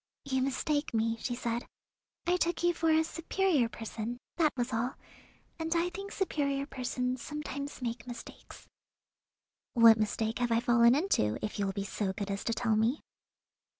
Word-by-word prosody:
"You 265 -2 0
mistake 275 +1 0
me," 225 +1 +2
she 245 +2 -3
said. 235 -1 -2 0.6
"I 355 - +3
took 345 -1 0
you 345 0 +4
for 330 -1 +1
a 315 0 +5
superior 330 -4 +1
person, 225 +1 -5 0.2
that 315 -3 +4
was 245 0 -1
all, 240 +3 -1 0.6
and 325 +1 -1
I 345 +1 +1
think 395 +3 -7
superior 280 -7 0
persons 250 -2 -2
sometimes 285 -2 -5
make 235 0 -4
mistakes." 240 -1 -10 1.1
"What 230 -2 +8
mistake 220 +1 -1
have 240 -1 0
I 230 - +4
fallen 235 0 +5
into, 275 - +1
if 210 - -5
you 200 - +1
will 195 - -2
be 200 - -2
so 200 -1 -2
good 200 0 -4
as 200 - -3
to 230 - +1
tell 225 -1 +1
me?" 225 +7 +2
250 Hz, 170 wpm, -31 LUFS, 225-305 Hz, 1.1 s, What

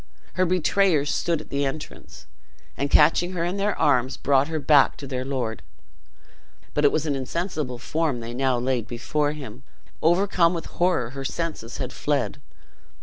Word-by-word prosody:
Her 185 0 +1
betrayers 180 -4 +2
stood 170 -3 0
at - - -15
the 140 0 0
entrance, 150 +3 -6 0.5
and 140 - -2
catching 165 +5 +4
her 170 -2 -1
in 180 +3 -2
their 200 +1 0
arms, 130 -5 +2
brought 140 0 +2
her 160 0 -2
back 145 -2 +4
to 140 - -8
their 130 -2 -3
lord. 125 -5 -3 1.1
But 150 - 0
it 145 - +6
was 155 0 0
an 150 - 0
insensible 145 -1 -3
form 150 +1 -1
they 115 +1 -6
now 130 0 +1
laid 125 -2 -1
before 145 +5 -1
him; 130 -5 -9 0.4
overcome 175 0 +3
with 165 - -4
horror 175 -10 0
her 135 0 -6
senses 145 -6 -4
had 130 -2 -4
fled. 145 -1 -1
145 Hz, 165 wpm, -24 LUFS, 130-165 Hz, 1.1 s, it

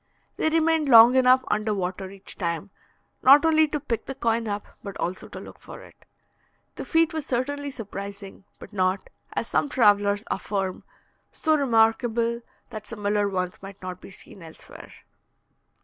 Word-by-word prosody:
They 315 - 0
remained 320 -2 +1
long 235 0 +9
enough 255 0 +5
under 215 0 0
water 190 0 -4
each 195 0 -10
time, 170 +1 -4 0.5
not 280 +4 +7
only 315 -1 +4
to 300 0 -3
pick 240 -5 -4
the 270 - -5
coin 230 -2 -1
up, 205 0 -4 0.2
but 200 -1 -8
also 180 +2 -4
to - - -9
look - - -12
for - - -11
it. - - -16 0.8
The - - -7
feat 325 -1 +2
was 315 -3 -4
certainly 285 +3 -2
surprising, 200 -5 -8
but - - -13
not, 185 -1 -1 0.2
as - - -2
some 290 - 0
travellers 205 -4 +3
affirm, 195 -3 -3 0.5
so 315 -1 +1
remarkable 235 -2 +1 0.3
that 215 -1 -8
similar 205 -2 -1
ones 185 -2 -3
might 195 0 -11
not 185 0 -7
be - - -12
seen 190 0 -13
elsewhere. 160 -1 -13
220 Hz, 160 wpm, -25 LUFS, 195-265 Hz, 0.8 s, long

